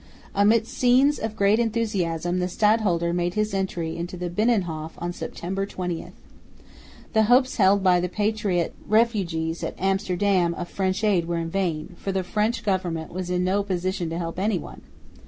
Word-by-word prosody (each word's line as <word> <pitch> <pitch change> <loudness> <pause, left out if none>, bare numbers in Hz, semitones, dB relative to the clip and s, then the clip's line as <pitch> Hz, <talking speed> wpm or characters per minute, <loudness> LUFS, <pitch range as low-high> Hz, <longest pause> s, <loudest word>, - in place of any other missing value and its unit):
Amidst 215 +3 +3
scenes 260 +4 +4
of 220 -1 -4
great 200 +2 +3
enthusiasm 185 -7 0
the 180 - 0
stadholder 185 -4 +2
made 175 0 -1
his 215 -1 0
entry 180 -4 -2
into 175 +2 -5
the 175 -1 -4
Binnenhof 175 -7 0
on 175 +1 -4
September 195 +3 -4
20. 180 -4 -4 1.1
The 220 -1 +4
hopes 255 +3 +3
held 195 -2 +4
by 180 -2 +5
the 180 +1 -1
patriot 205 -3 0
refugees 185 -8 +1
at - - -3
Amsterdam 190 -2 +1
of 175 0 -5
French 190 +2 -1
aid 190 -6 +2
were 170 -1 -1
vain, 170 -1 -2
for 195 - -3
the 190 -1 -1
French 215 +5 -1
government 180 -6 -2
was 185 0 -4
in 180 0 0
no 190 +2 +2
position 185 -2 -2
to 165 - -3
help 170 0 -4
anyone. 195 -3 -2
185 Hz, 160 wpm, -24 LUFS, 175-210 Hz, 1.1 s, by